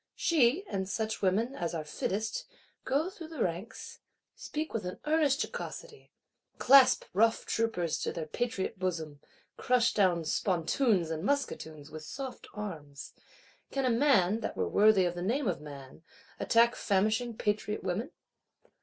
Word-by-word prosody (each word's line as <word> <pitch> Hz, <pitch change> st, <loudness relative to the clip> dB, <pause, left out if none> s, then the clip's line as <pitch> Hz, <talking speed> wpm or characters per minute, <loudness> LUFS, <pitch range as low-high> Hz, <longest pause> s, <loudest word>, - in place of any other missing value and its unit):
She, 315 Hz, -, +2 dB
and 190 Hz, -, -3 dB
such 220 Hz, +1 st, -2 dB
women 210 Hz, +7 st, +1 dB
as 175 Hz, -9 st, -3 dB
are 160 Hz, -, -3 dB
fittest, 200 Hz, +8 st, -3 dB, 0.4 s
go 290 Hz, +8 st, 0 dB
through 345 Hz, -5 st, -9 dB
the 315 Hz, -7 st, -2 dB
ranks; 180 Hz, +6 st, -5 dB, 0.4 s
speak 310 Hz, +1 st, -5 dB
with 225 Hz, -, -2 dB
an 180 Hz, 0 st, -6 dB
earnest 300 Hz, -2 st, +2 dB
jocosity; 475 Hz, -3 st, -8 dB, 0.5 s
clasp 265 Hz, 0 st, +6 dB
rough 225 Hz, +4 st, +3 dB
troopers 200 Hz, -8 st, -1 dB
to -, -, -2 dB
their 165 Hz, -, -4 dB
patriot 205 Hz, +2 st, -3 dB
bosom, 160 Hz, -6 st, -3 dB, 0.4 s
crush 245 Hz, -1 st, +2 dB
down 180 Hz, -5 st, +2 dB
spontoons 180 Hz, -, +1 dB
and 160 Hz, 0 st, -3 dB
musketoons 160 Hz, -, -2 dB
with 155 Hz, 0 st, -8 dB
soft 265 Hz, -, -7 dB
arms: 155 Hz, -9 st, -7 dB, 0.6 s
can 270 Hz, -1 st, -1 dB
a 250 Hz, -, +3 dB
man, 230 Hz, -6 st, +3 dB
that 225 Hz, -, -5 dB
were -, -, 0 dB
worthy 205 Hz, -2 st, +5 dB
of 175 Hz, -, 0 dB
the 175 Hz, -, -6 dB
name 240 Hz, +8 st, 0 dB
of 180 Hz, -, -1 dB
man, 140 Hz, -1 st, -11 dB, 0.4 s
attack 235 Hz, +1 st, +4 dB
famishing 215 Hz, +4 st, 0 dB
patriot 210 Hz, 0 st, -1 dB
women? 205 Hz, -, -2 dB
210 Hz, 145 wpm, -30 LUFS, 175-250 Hz, 0.6 s, clasp